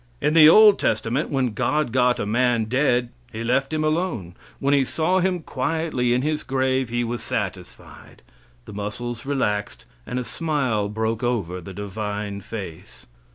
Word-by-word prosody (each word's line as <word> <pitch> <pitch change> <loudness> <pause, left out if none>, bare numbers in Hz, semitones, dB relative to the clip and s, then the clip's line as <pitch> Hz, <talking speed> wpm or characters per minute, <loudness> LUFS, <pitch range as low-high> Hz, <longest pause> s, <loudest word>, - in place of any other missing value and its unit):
In 150 +1 +1
the 155 -1 +9
old 210 +3 +7
testament, 115 +7 0
when 130 -5 0
God 150 +2 0
got 125 0 +3
a - - -1
man 120 +1 +1
dead, 125 0 +1 0.2
He 110 0 -5
let 135 +4 +1
him 155 0 -1
alone. 155 - -1 0.2
When 140 +1 +1
He 140 -1 +4
saw 165 +7 0
him 180 -2 0
quietly 130 -3 -1
in 125 +1 +2
his 155 0 -1
grave 130 -1 0
He 120 +1 -1
was 120 0 -3
satisfied. - - -6 0.4
The - - -10
muscles 120 +4 -5
relaxed, 105 -7 -2 0.2
and 125 - -3
a 125 - -1
smile 130 -9 -1
broke 110 +1 -2
over 100 -8 -2
the 95 +2 -10
Divine 105 0 -4
face. 100 -6 -9
125 Hz, 160 wpm, -23 LUFS, 110-145 Hz, 0.4 s, the